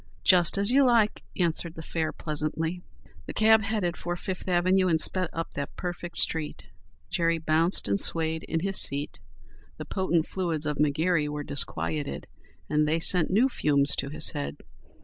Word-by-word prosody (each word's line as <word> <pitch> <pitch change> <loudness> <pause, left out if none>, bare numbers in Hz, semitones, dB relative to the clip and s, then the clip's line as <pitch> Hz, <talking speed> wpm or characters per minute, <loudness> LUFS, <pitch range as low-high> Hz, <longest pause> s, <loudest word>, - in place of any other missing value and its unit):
"Just 180 -1 +4
as 200 +3 +2
you 275 +2 +5
like," 235 -4 +2 0.2
answered 170 -1 -1
the 160 - -8
fare, 160 -1 -2
pleasantly. 160 +3 -2 0.5
The - - -7
cab 220 0 +5
headed 200 -5 -2
for 175 0 -4
Fifth 185 +1 -6
avenue 185 +1 +2
and 165 -2 +2
sped 185 +1 0
up 165 0 -5
that 140 0 -5
perfect 175 -1 -6
street. 160 -2 +1 0.4
Jerry 165 -1 +1
bounced 160 +3 +1
and 100 0 +1
swayed 160 -1 +2
in 165 0 -2
his 195 +1 -1
seat. 140 +1 -3 0.6
The - - -7
potent 175 -4 0
fluids 170 -5 -3
of 150 -1 -2
McGary 150 +1 +1
were 150 0 -4
disquieted 80 - -3 0.4
and 150 0 +1
they 160 +2 +1
sent 165 -1 +5
new 220 +8 +3
fumes 140 - +1
to 140 - -2
his 155 +1 -1
head. 70 0 -5
165 Hz, 170 wpm, -27 LUFS, 150-185 Hz, 0.6 s, you